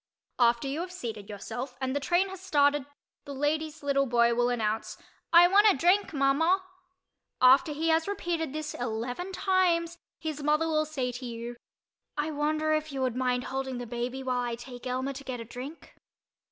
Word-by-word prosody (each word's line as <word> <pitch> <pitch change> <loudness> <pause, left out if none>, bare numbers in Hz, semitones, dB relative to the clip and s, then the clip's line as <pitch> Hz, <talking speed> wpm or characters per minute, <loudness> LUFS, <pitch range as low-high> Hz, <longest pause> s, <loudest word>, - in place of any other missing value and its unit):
After 235 +2 +3
you 280 +3 -2
have 355 +1 -4
seated 225 - -6
yourself 245 +5 -6
and 260 0 -2
the - - +1
train 350 +7 +1
has 380 -1 -9
started 285 -6 +2 0.4
the 280 - -7
lady's 305 +2 -1
little 275 -1 +2
boy 235 -1 +3
will 240 +1 +2
announce, 220 -2 -2 0.3
"I 345 +1 +8
want 410 +3 +6
a - - -1
drink, 360 +8 +3
Mama." 320 +6 +2 0.8
After 265 +5 +6
he 315 +3 -1
has 320 +1 +2
repeated 340 -6 -2
this 310 +1 -4
eleven 245 +9 -4
times 355 -3 +1 0.2
his 310 -2 -4
mother 300 +2 +2
will 310 -1 +1
say 265 -5 -2
to 245 +1 -7
you 235 +1 -6 0.6
"I 300 +1 -1
wonder 310 +1 0
if 310 0 -1
you 270 -1 -3
would 250 -2 0
mind 250 -1 0
holding 265 -1 -3
the 245 - -5
baby 245 +3 -4
while 250 -1 0
I 240 -1 -2
take 245 +1 -9
Elmer 260 +2 -2
to 275 +1 -9
get 255 -2 -5
a 230 - -6
drink?" 260 +7 -9
275 Hz, 185 wpm, -28 LUFS, 245-320 Hz, 0.8 s, I